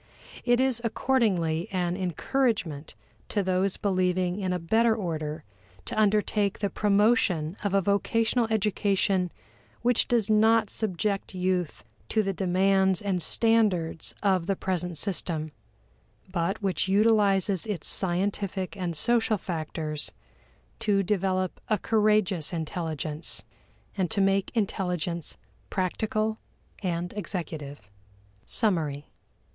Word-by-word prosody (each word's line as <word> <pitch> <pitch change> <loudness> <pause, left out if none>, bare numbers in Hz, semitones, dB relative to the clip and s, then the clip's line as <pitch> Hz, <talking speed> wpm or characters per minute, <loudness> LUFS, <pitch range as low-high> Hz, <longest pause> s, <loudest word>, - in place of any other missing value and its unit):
It 245 0 +3
is 260 -3 +2
accordingly 195 -9 +1
an 180 -2 0
encouragement 185 - -1 0.3
to 205 - 0
those 185 +1 0
believing 185 -1 0
in 185 -2 -1
a 180 - 0
better 220 +7 +2
order 155 -6 -4 0.4
to - - -5
undertake 210 -1 +2
the 200 -2 -2
promotion 200 -6 +2
of 200 -1 0
a 195 - +4
vocational 225 +4 +1
education 195 -3 +1 0.5
which 245 -1 +3
does 230 -4 +2
not 220 0 +4
subject 200 -1 -2
youth 180 -3 -1 0.3
to 220 - +2
the 195 -1 -1
demands 190 0 +2
and 190 -3 0
standards 200 -5 +2
of 190 -4 +2
the 195 - +1
present 180 -3 -2
system, 160 -4 -1 0.8
but 190 +4 -1
which 190 -1 0
utilizes 200 -2 +3
its 200 -7 -2
scientific 190 +1 -1
and 175 -4 -3
social 230 +1 +2
factors 155 -4 -3 0.7
to 205 -3 +2
develop 185 -1 -1
a 215 - +3
courageous 210 -6 +2
intelligence, 160 -2 -2 0.5
and 185 -4 0
to 200 - -1
make 195 0 +2
intelligence 180 -6 -2 0.3
practical 215 +3 -1 0.4
and 175 -2 -2
executive. 160 - -5 0.6
Summary. 155 -10 +1
190 Hz, 110 wpm, -27 LUFS, 175-210 Hz, 0.8 s, a